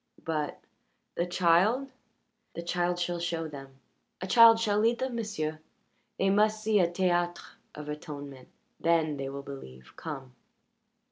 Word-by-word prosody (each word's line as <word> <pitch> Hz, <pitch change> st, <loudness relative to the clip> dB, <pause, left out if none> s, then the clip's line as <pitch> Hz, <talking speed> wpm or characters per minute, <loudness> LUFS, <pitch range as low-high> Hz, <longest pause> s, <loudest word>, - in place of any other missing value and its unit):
"But 155 Hz, -2 st, -2 dB, 0.5 s
the 170 Hz, -, -1 dB
child?" 185 Hz, +10 st, +3 dB, 0.6 s
"The 170 Hz, -, -5 dB
child 175 Hz, 0 st, 0 dB
shall 175 Hz, 0 st, -2 dB
show 165 Hz, -1 st, -2 dB
them 135 Hz, -3 st, -11 dB, 0.4 s
a 185 Hz, -, -4 dB
child 225 Hz, +3 st, +7 dB
shall 210 Hz, -2 st, +1 dB
lead 230 Hz, +2 st, +3 dB
them, 260 Hz, -1 st, -3 dB
m'sieu'. 160 Hz, -9 st, -3 dB, 0.6 s
They 195 Hz, 0 st, +2 dB
must 215 Hz, +1 st, +2 dB
see 215 Hz, -1 st, +3 dB
a 175 Hz, -2 st, +3 dB
théâtre 175 Hz, -1 st, -1 dB, 0.2 s
of 150 Hz, 0 st, -8 dB
atonement 145 Hz, -3 st, -7 dB, 0.3 s
then 160 Hz, -3 st, +2 dB
they 135 Hz, -1 st, -4 dB
will 140 Hz, 0 st, -6 dB
believe. 65 Hz, -, -11 dB
Come." 135 Hz, -5 st, -7 dB
170 Hz, 140 wpm, -29 LUFS, 150-205 Hz, 0.6 s, child